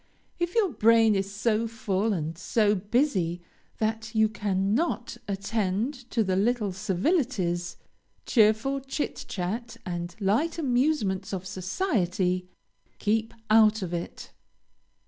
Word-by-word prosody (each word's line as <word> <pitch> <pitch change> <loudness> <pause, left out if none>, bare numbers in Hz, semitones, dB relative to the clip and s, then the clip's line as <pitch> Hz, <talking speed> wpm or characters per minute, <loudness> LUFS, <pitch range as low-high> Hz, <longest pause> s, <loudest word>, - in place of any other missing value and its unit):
If 345 +3 -1
your 415 -6 +3
brain 225 -2 +5
is 195 0 -1
so 220 +2 0
full 220 -2 -1
and 165 -4 -2
so 210 +4 +2
busy 200 - 0 0.4
that 220 0 -2
you 220 0 +4
cannot 210 - -1
attend 210 +5 -2
to 230 - +1
the 190 -2 0
little 215 +1 +1
civilities, 185 - 0 0.5
cheerful 225 +4 +3
chit 270 +2 -4
chat, 225 +6 -4
and 175 -1 -4
light 230 - +1
amusements 245 - 0
of 185 -1 -4
society, 185 - -1 0.5
keep 220 +2 0 0.2
out 220 -1 +5
of 175 -1 -4
it. 170 0 -5
215 Hz, 115 wpm, -27 LUFS, 190-235 Hz, 0.5 s, brain